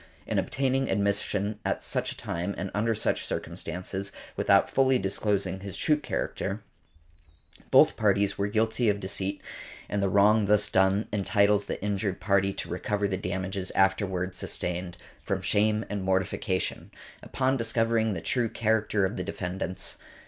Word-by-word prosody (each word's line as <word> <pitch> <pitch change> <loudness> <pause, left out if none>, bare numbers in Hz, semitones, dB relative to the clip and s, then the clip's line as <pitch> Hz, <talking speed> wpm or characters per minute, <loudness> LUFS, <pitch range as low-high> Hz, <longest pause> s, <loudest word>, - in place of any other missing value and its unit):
In - - 0
obtaining 135 0 0
admission 100 +1 0
at - - -2
such - - -1
a - - -9
time 90 +4 -3
and 95 +1 -4
under 110 +2 +1
such 105 - 0
circumstances, 95 +3 -5 0.2
without - - +4
fully 130 -1 +3
disclosing 95 -1 -1
his 100 0 -7
true 150 - +3
character, 110 -7 -3 1.1
both - - +6
parties 100 0 +2
were 100 - 0
guilty 110 +2 +1
of 100 -1 +1
deceit, 95 0 -2 0.4
and 100 - -1
the 100 - +2
wrong 105 +2 +5
thus 105 +1 +3
done 95 +3 +3
entitles 100 0 +2
the - - -3
injured 100 -2 -1
party 100 -1 +2
to - - -5
recover 105 -1 -1
the 95 - -1
damages 95 0 -3
afterward 95 -1 +1
sustained, 90 0 -3 0.2
from 100 - -2
shame 105 +3 +2
and 105 -1 -3
mortification, 95 0 -1 0.3
upon 130 0 0
discovering 115 -2 +1
the 80 - -4
true 120 +5 +1
character 110 -3 +1
of 100 +5 -3
the - - -2
defendants." 95 0 -4
100 Hz, 150 wpm, -28 LUFS, 95-110 Hz, 1.1 s, both